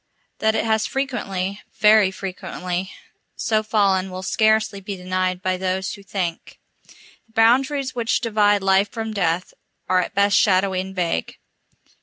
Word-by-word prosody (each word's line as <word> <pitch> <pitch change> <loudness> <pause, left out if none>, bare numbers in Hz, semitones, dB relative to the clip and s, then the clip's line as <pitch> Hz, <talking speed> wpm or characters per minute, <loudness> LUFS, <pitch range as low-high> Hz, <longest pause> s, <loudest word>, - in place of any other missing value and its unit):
That 220 0 +2
it - - 0
has 220 -1 +1
frequently, 200 -8 -3 0.2
very 210 -2 +6
frequently, 185 -1 -5 0.4
so 215 -1 0
fallen 200 -3 +1
will 185 0 -7
scarcely 215 0 +1
be 195 +1 -5
denied 185 0 -2
by 185 0 0
those 190 0 -2
who 200 - -10
think. 185 -4 -4 0.7
The 225 - -30
boundaries 260 +4 +2
which 235 -2 0
divide 205 -3 +2
Life 195 +1 +3
from 220 0 -5
Death 180 -3 -1 0.3
are 185 0 +3
at - - -6
best 200 0 +3
shadowy 190 -1 +3
and 190 +1 -8
vague. 170 - -2
195 Hz, 145 wpm, -22 LUFS, 185-220 Hz, 0.7 s, very